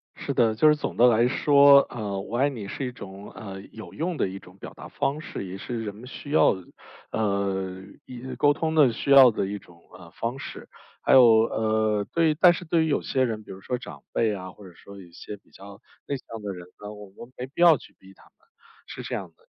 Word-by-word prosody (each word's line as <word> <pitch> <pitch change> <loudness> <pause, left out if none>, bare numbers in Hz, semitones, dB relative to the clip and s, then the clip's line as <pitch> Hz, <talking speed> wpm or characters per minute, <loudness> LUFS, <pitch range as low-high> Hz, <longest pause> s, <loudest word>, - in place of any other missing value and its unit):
是 - - -4
的， 110 -2 +2
就 155 +8 +4
是 150 - +6
总 150 - -5
的 120 +1 +6
来 120 +1 +4
说， 140 +1 +6
呃， 105 -4 -4
“我 115 +4 -5
爱 140 +3 +3
你” 110 -7 -7
是 135 +5 -5
一 125 - -4
种， 100 -3 -11
呃， 95 -2 -9
有 110 - -11
用 170 0 -3
的 - - 0
一 95 +1 -7
种 90 +2 -17
表 - - -10
达 - - -11
方 145 +3 -2
式， 100 - -7
也 95 +1 -7
是 115 +1 -5
人 105 -1 -6
们 120 +4 -12
需 145 +2 -9
要 150 - +4
的， 95 - -11 0.5
呃， 100 -3 -2 0.2
也 130 +1 -8
沟 145 0 +3
通 160 +1 -2
的 145 -6 +5
需 140 +5 -3
要 135 -2 +9
的 100 - -2
一 100 0 -5
种， 85 -3 -20 0.2
呃， 85 -2 -14
方 120 +6 -4
式。 - - -9 0.3
还 - - +2
有， 130 - +9 0.2
呃， 110 -2 0
对 165 -2 +3
但 175 +2 +6
是 175 +1 -7
对 160 0 +2
于 - - -1
有 - - +1
些 130 -2 0
人， 110 -3 -3
比 - - -12
如 95 0 -10
说 125 - -3
长 - - -11
辈 110 -2 +1
啊， 95 -1 -7
或 100 -1 -14
者 90 - -15
说 100 +2 -13
一 85 -2 -15
些 105 - -9
比 - - -30
较 100 0 -13 0.3
内 140 - -2
向 115 -3 -10
的 100 -1 -5
人 90 -1 -10
呢， 105 0 -7
我 105 -1 -10
们 120 +6 -13
没 125 - -4
必 145 +6 -7
要 165 -4 +7
去 - - -17
逼 95 0 -17
他 - - -22
们， - - -23 0.6
是 - - -8
这 - - -4
样 90 -4 -6
的。 - - -30
110 Hz, 265 characters per minute, -25 LUFS, 100-135 Hz, 0.6 s, 要